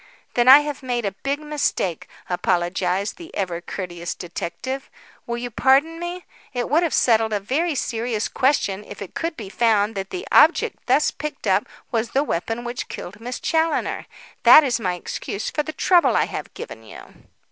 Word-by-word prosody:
"Then 240 0 +2
I 270 +3 +10
have 295 -1 -5
made 245 -3 -2
a 200 - 0
big 275 +9 -3
mistake," 295 - -2 0.2
apologised 180 +2 0
the 340 -2 -10
ever 180 -3 -2
courteous 175 -2 -5
detective. 180 +10 -5 0.4
"Will 235 0 -2
you 245 0 -5
pardon 275 +8 +3
me? 350 +1 -5 0.3
It 245 +1 -2
would 315 +3 +4
have 340 -3 0
settled 225 -2 +3
a 205 - +1
very 295 - -1
serious 230 -3 -1
question 210 -7 +1
if - - -10
it 200 - -8
could 330 -1 -3
be 215 - -7
found 215 0 +2
that 195 -2 -5
the 370 +4 -5
object - - +4
thus 270 +4 +3
picked 300 +1 -6
up - - +2 0.2
was 230 -1 0
the 275 - +1
weapon 225 - -2
which 240 +1 -5
killed 205 +5 -8
Miss 245 +2 -5
Challoner. 320 0 0 0.3
That 310 - +9
is 250 -4 0
my 180 -5 -1
excuse 200 +3 -5
for 300 - 0
the 315 - -5
trouble 345 +4 +3
I - - +3
have - - -6
given - - -8
you." - - -11
240 Hz, 180 wpm, -22 LUFS, 200-295 Hz, 0.4 s, I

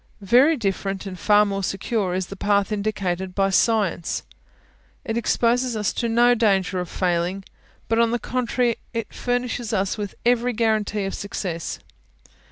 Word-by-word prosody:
Very 265 - +5
different, 195 -2 -2
and 185 -2 -7
far 210 0 +5
more 195 -1 -2
secure, 195 0 -1
is 185 0 -1
the 195 - -9
path 200 +1 +1
indicated 190 -3 -2
by 195 -1 +2
SCIENCE; 200 -5 +1 0.8
it 225 - -2
exposes 235 +1 +1
us 210 -2 0
to 235 - -1
no 240 +2 +5
danger 195 -5 +1
of 180 -2 -4
failing, 180 +1 -1 0.4
but, 225 0 +1
on 230 0 +4
the 240 - 0
contrary, 245 0 0 0.2
it 230 -2 -3
furnishes 245 -2 -2
us 195 +1 0
with 205 -2 -4
every 245 0 +2
guarantee 215 -2 0
of 195 - -3
success. 180 -4 -4
210 Hz, 155 wpm, -23 LUFS, 195-235 Hz, 0.8 s, Very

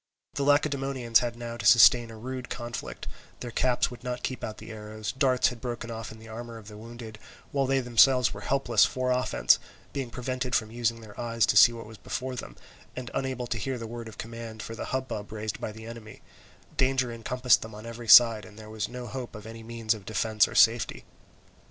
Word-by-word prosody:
The 140 - -3
Lacedaemonians 135 -4 +2
had 120 -1 -3
now 120 0 -6
to 120 - -6
sustain 120 0 +7
a 115 - -10
rude 125 +2 -6
conflict; 120 -1 -6 0.3
their 120 - -5
caps 125 +1 +1
would 120 -1 -11
not 125 -1 -4
keep 130 - -3
out 110 - -5
the - - -10
arrows, 110 0 -6
darts 130 -1 +2
had 120 -2 -10
broken 120 -1 -5
off 115 -1 -6
in 110 - -11
the 110 0 -13
armour 115 +1 -8
of 110 -2 -13
the 105 - -11
wounded, 115 0 -10 0.3
while 135 -1 +1
they 135 0 +2
themselves 125 0 +4
were - - -8
helpless 130 -5 +3
for 130 0 0
offence, 125 0 +3 0.3
being 135 -3 -3
prevented 125 +1 -3
from 110 -1 0
using 115 0 -1
their 105 -2 -12
eyes 115 -2 +1
to - - +1
see 115 +3 +9
what 115 -1 -8
was 110 0 -12
before 130 0 -4
them, - - -7 0.4
and 125 -1 -6
unable 130 -2 -2
to 115 -1 -3
hear 130 +4 -2
the 115 - -6
words 115 0 -7
of 105 - -13
command 115 -1 -7
for 115 - -7
the 115 - -5
hubbub 130 -6 -4
raised 110 -1 -5
by - - -3
the 110 +1 -11
enemy; 115 -2 -10 0.5
danger 130 -2 +2
encompassed 125 +1 +2
them 110 -1 -8
on 105 +2 -10
every 115 0 -8
side, 115 -1 +8
and 105 +3 -14
there 110 0 -11
was 110 -2 -3
no 125 0 -7
hope 125 -1 -6
of 105 -1 -9
any 115 0 -9
means 115 -1 -1
of 105 -3 -10
defence 110 +1 +2
or - - -9
safety. 115 0 +3
115 Hz, 220 wpm, -28 LUFS, 110-125 Hz, 0.5 s, see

